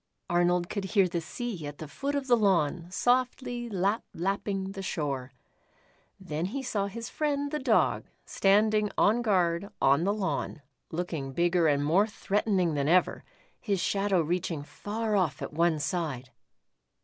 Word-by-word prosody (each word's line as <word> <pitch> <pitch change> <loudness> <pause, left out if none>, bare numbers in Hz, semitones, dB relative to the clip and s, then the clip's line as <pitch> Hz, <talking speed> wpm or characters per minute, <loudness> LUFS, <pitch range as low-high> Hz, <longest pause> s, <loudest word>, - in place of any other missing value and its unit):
Arnold 175 0 +2
could 200 +1 -3
hear 195 -1 +3
the 170 -1 -2
sea 185 -3 -5
at 145 0 -8
the 155 - -7
foot 280 - -3
of 280 -1 -1
the 250 -2 +5
lawn 175 -6 +1
softly 245 +3 0
"lap 200 +2 0
lapping" 195 +1 -2
the 195 0 -6
shore. 140 -8 -3 0.9
Then 170 -3 -3
he 265 +8 -4
saw 200 -5 -1
his 230 +3 -6
friend, 285 -2 -1
the 300 - -1
Dog, 245 -5 +2 0.2
standing 210 +1 +3
on 225 +4 +4
guard, 185 -3 +1
on 140 +4 +4
the 195 - +2
lawn, 190 -7 -2 0.3
looking 160 -5 -4
bigger 175 +1 +2
and 145 -1 +2
more 185 +8 +4
threatening 200 -5 0
than 140 -1 0
ever, 180 +3 +3 0.4
his 200 -5 -1
shadow 195 0 +1
reaching 165 -2 -2
far 215 +7 -3
off 165 -9 +1
at - - -6
one 165 0 +2
side. 145 -6 -3
190 Hz, 155 wpm, -28 LUFS, 165-215 Hz, 0.9 s, the